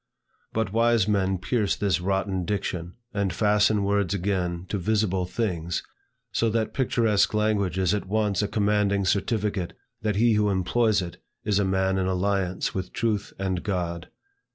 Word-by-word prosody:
But 110 -3 -1
wise 115 -2 +3
men 95 -2 +1
pierce 105 +2 0
this 95 -5 0
rotten 95 0 0
diction 90 -2 -3 0.2
and 100 -2 0
fasten 105 0 +3
words 100 -1 +1
again 90 -2 -1
to 100 - -1
visible 95 -2 +1
things; 90 -5 -2 0.5
so 115 - +1
that 110 0 -1
picturesque 115 -6 +2
language 105 -4 +1
is 95 0 +2
at 105 -2 -2
once 105 -1 +1
a 105 - 0
commanding 100 -1 +1
certificate 100 -2 0 0.3
that 105 -2 0
he 115 +2 +4
who 105 -1 +2
employs 100 +2 +2
it, 85 - -8 0.3
is 105 -2 +1
a 100 - +2
man 95 0 +1
in 95 - 0
alliance 95 0 0
with 90 -1 -4
truth 110 -5 -1
and 95 -2 -1
God. 85 -4 -3
100 Hz, 155 wpm, -26 LUFS, 95-105 Hz, 0.5 s, he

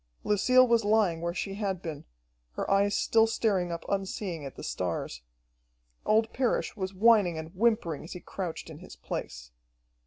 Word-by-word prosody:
Lucille 255 +5 +4
was 235 -1 +3
lying 205 -6 +2
where 170 0 -1
she 190 +2 -4
had 195 -3 -2
been, 160 -4 -7 0.5
her - - -3
eyes 200 +1 +3
still 225 0 +3
staring 195 -6 0
up 170 - -5
unseeing 195 -4 -3
at 135 - -8
the - - -9
stars. 85 -8 -3 0.9
Old 220 +1 +3
Parrish 255 -2 0
was 190 -3 -3
whining 205 -5 +4
and 160 +2 -7
whimpering 210 -7 +1
as 160 - -8
he 180 - -7
crouched 175 -3 -6
in 155 - -10
his 185 - -12
place. - - -6
195 Hz, 165 wpm, -29 LUFS, 165-220 Hz, 0.9 s, Lucille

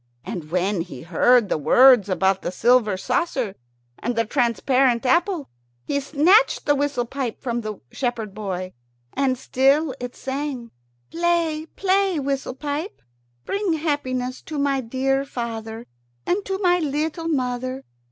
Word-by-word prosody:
And 170 -7 -6
when 185 +2 0
he 165 -7 -8
heard 215 +7 +4
the 155 - -1
words 240 - +6
about 190 0 +1
the - - -3
silver 225 -1 +3
saucer 250 - -1 0.5
and 240 +1 -2
the 230 0 +1
transparent 250 +1 +2
apple, 340 +2 +1 0.4
he 280 - 0
snatched 320 - +3
the 290 - +4
whistle 285 -3 0
pipe 255 -2 -4
from 240 -2 -2
the 215 -2 -6
shepherd 235 -6 -3
boy. 185 -3 -5 0.4
And 265 -2 +1
still 275 +4 +2
it 245 0 -6
sang: 265 -3 -4 0.4
"Play, 330 -2 0
play, 385 -3 +2
whistle 275 -2 -2
pipe! 295 +7 -5 0.4
Bring 400 -3 0
happiness 260 -5 -2
to 310 - -7
my 280 -1 +1
dear 270 +3 0
father 230 -3 -5 0.4
and 390 +3 0
to 385 -1 -2
my 360 -2 +3
little 315 +2 -2
mother. 255 -2 -2
260 Hz, 140 wpm, -23 LUFS, 230-300 Hz, 0.5 s, words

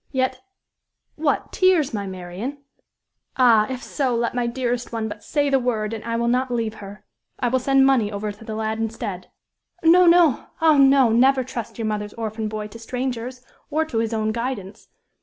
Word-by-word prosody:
Yet 260 -1 -1 0.7
What! 305 -2 -1
tears, 365 -8 +3
my 200 -2 -3
Marian! 185 +9 -6 0.8
Ah, 230 -4 +5
if 255 -1 -5
so! 260 -4 -1
let 235 0 -1
my 245 -1 -1
dearest 245 0 -2
one 225 -1 -2
but 210 - -8
say 290 -1 0
the 270 -1 +3
word, 225 -3 -1
and 220 - -6
I 230 0 -3
will 235 0 0
not 255 +2 +1
leave 230 -3 -1
her. 200 +1 -11 0.3
I 245 - +1
will 260 +2 +1
send 270 +1 +3
money 245 -6 +3
over 205 +1 -3
to 205 +2 -14
the 220 -1 -6
lad 220 0 -2
instead." 215 -5 -4 0.6
"No, 350 +2 +6
no! 335 -6 +4
Ah! 320 -2 +5
no, 270 -2 +6
never 260 +3 +4
trust 240 -3 -7
your 225 - -3
mother's 210 -1 -3
orphan 220 -1 -4
boy 215 0 -4
to 230 - -11
strangers, 250 +1 -4 0.2
or 315 +2 0
to 245 -8 -2
his 225 0 -1
own 220 -1 0
guidance. 230 -4 -5
235 Hz, 190 wpm, -22 LUFS, 220-265 Hz, 0.8 s, No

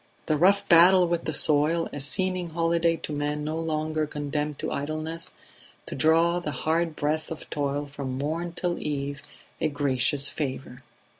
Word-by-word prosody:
The 155 - +1
rough 190 +6 +3
battle 180 +2 +7
with 170 0 -2
the - - -1
soil 155 +2 +3
a 145 - -5
seeming 180 +5 -1
holiday 165 0 +1
to 150 - -4
men 145 0 -2
no 155 +2 -3
longer 155 -1 -1
condemned 150 0 -3
to - - -4
idleness; 155 +3 -4 0.5
to - - -6
draw 165 +4 +3
the 170 - -4
hard 160 +4 -1
breath 155 +1 -1
of 160 - -7
toil 145 0 -1
from 140 -2 -6
morn 165 +5 -3
till 175 0 -2
eve 140 -1 -3 0.4
a - - +2
gracious 140 0 +1
favour 135 -3 -4
155 Hz, 160 wpm, -26 LUFS, 145-165 Hz, 0.5 s, battle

